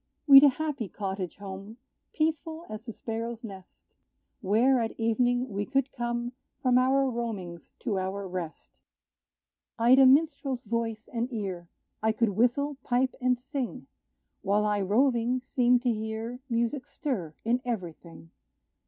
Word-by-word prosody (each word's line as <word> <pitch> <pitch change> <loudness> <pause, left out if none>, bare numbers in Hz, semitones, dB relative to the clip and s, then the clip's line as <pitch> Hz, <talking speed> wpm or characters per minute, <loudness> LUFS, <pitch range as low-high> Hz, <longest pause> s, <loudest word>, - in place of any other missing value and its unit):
We'd 275 -1 +10
a 290 - +9
happy 275 -6 -3
cottage 190 -2 -4
home, 200 +2 -8 0.3
Peaceful 320 +1 -2
as 215 +3 -8
the - - -3
sparrow's 230 +1 -5
nest, 195 -4 -12 0.5
Where, 240 +5 +3
at 225 0 -3
evening, 245 +2 +1
we 205 -3 -3
could 270 +3 0
come 240 0 -3 0.3
From 250 -1 +3
our 270 +1 +3
roamings 215 -9 -5
to 200 -4 -1
our 190 +1 -3
rest. 180 -3 -7 1.0
I'd 245 +3 +6
a 265 - +8
minstrel's 275 -2 +2
voice 225 0 -3
and 240 +2 -2
ear: 190 -7 -4 0.3
I 220 0 +2
could 225 0 +2
whistle, 250 +7 +1
pipe 255 +1 +1
and 250 -1 +2
sing, 265 -1 -5 0.6
While 205 +2 +1
I 210 -1 +1
roving, 240 +4 +2
seemed 245 -2 +3
to 245 -2 +2
hear 220 +3 -4
Music 235 +3 -1
stir 190 - -4
in 240 +2 +1
every 205 -10 -3
thing. 165 0 -15
235 Hz, 145 wpm, -28 LUFS, 205-255 Hz, 1.0 s, We'd